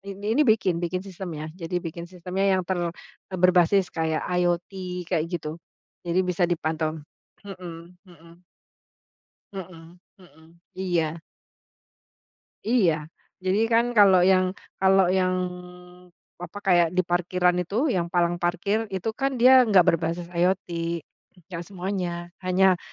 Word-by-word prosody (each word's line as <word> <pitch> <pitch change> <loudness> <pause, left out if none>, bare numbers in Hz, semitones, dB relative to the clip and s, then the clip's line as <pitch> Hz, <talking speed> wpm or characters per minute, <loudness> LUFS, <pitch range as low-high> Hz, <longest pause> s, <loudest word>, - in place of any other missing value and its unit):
in 200 +1 -9
ini 235 +5 +2
bikin 185 -6 +2
bikin 180 +2 -3
sistemnya. 170 -5 -7
Jadi 180 0 -5
bikin 170 0 -5
sistemnya 185 +2 0
yang 185 - -1
ter 180 0 -2
eee, 175 +2 -7
berbasis 180 +1 +3
kayak 160 -1 -1
IoT 180 +1 -2
kayak 160 -2 +2
gitu, 165 -1 -5 0.4
jadi 175 +2 +1
bisa 180 -1 0
dipantau, 160 -2 -1 0.5
mhm 175 -3 -9 0.2
mhm. 170 +1 -18 1.1
Mhm 175 -3 -10 0.2
mhm, 170 -2 -20
iya. 170 -3 -1 1.5
Iya 215 -9 +4 0.5
jadi 185 +3 +1
kan 230 +1 +4
kalau 190 -3 +7
yang 185 0 +3 0.2
kalau 190 -1 +4
yang, 185 -1 +2 1.0
apa, 175 +3 -9
kayak 175 -4 +4
di 185 - +3
parkiran 180 0 +1
itu 210 - 0
yang 180 -7 0
palang 175 0 +2
parkir 185 +6 -1
itu 190 +4 -2
kan 270 0 0
dia 255 0 +8
nggak 200 -4 +6
berbasis 170 +1 -1
IoT, 180 +2 0 0.8
gak 170 -2 -5
semuanya 180 -3 -4 0.2
hanya 185 0 +4
180 Hz, 125 wpm, -25 LUFS, 170-190 Hz, 1.5 s, dia